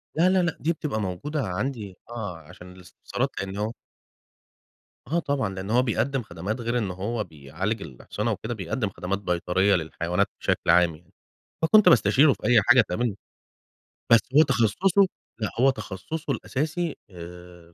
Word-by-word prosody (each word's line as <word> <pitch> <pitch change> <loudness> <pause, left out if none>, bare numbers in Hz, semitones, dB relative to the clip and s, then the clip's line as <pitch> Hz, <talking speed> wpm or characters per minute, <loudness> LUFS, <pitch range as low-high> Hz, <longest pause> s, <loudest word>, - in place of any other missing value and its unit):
لا، 175 +3 +4
لا، 190 0 +3
لأ 175 - -1
دي 165 +3 +1
بتبقى 140 -9 -3
موجودة 135 - -3
عندي، 100 0 -4
آه 105 -8 -5
عشان 90 +3 -13
الاستفسارات 90 -1 -4
لأن 95 +1 -5
هو 105 +2 -1 1.4
آه، 170 - +3
طبعًا 140 -8 -1
لأنه 100 +5 -1
هو 125 - +6
بيقدِّم 125 +2 0
خدمات 105 +6 -5
غير 120 +1 -1
إن 105 -6 -1
هو 105 +5 -3
بيعالج 85 +9 -4
الأحصنة 90 - -4
وكده، 120 +3 -4
بيقدم 100 +2 -2
خدمات 95 +1 -3
بيطرية 95 +1 +1
للحيوانات 85 +3 -1
بشكل - - 0
عام، 85 -2 +5
يعني 85 +4 -22 0.5
فكنت 210 +6 +6
باستشيرُه 125 +6 +5
في - - -5
أي 120 -3 +6
حاجة 120 +4 +6
تقابلني، 105 +2 -2 0.9
بس 115 - +9 0.2
هو 155 - +9
تخصُّصه 140 - +3 0.3
لأ، 110 - -1
هو 135 - +6
تخصُّصه 135 - -4
الأساسي 155 +7 -2 0.2
آآ 90 -1 -12
105 Hz, 150 wpm, -25 LUFS, 90-130 Hz, 1.4 s, بس